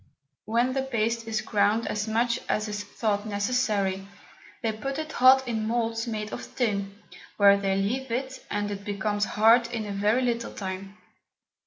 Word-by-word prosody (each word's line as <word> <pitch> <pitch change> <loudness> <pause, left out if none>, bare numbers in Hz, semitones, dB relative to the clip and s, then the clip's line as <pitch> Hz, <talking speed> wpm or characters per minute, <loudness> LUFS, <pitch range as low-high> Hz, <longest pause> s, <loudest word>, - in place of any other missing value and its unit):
When 235 +4 +1
the 270 - 0
Paste 230 -3 -1
is 220 -1 -1
ground 210 +1 +1
as 210 +1 -2
much 235 +2 +1
as 215 0 0
is 210 0 -4
thought 205 0 -2
necessary, 205 -3 0 0.6
they 225 - +1
put 270 +6 -4
it 310 0 -4
hot 260 0 +5
in 220 -2 -1
Moulds 230 0 -1
made 215 -2 -4
of - - -8
Tin, 200 -4 -1 0.4
where 200 -1 +7
they 195 -1 0
leave 245 +7 -1
it, 260 +3 -3
and 205 0 -2
it 200 0 -5
becomes 205 +1 -1
hard 230 +2 +6
in 230 -2 -4
a 205 - -5
very 210 +5 +1
little 235 -1 -1
time. 195 +1 -6
220 Hz, 170 wpm, -27 LUFS, 205-235 Hz, 0.6 s, where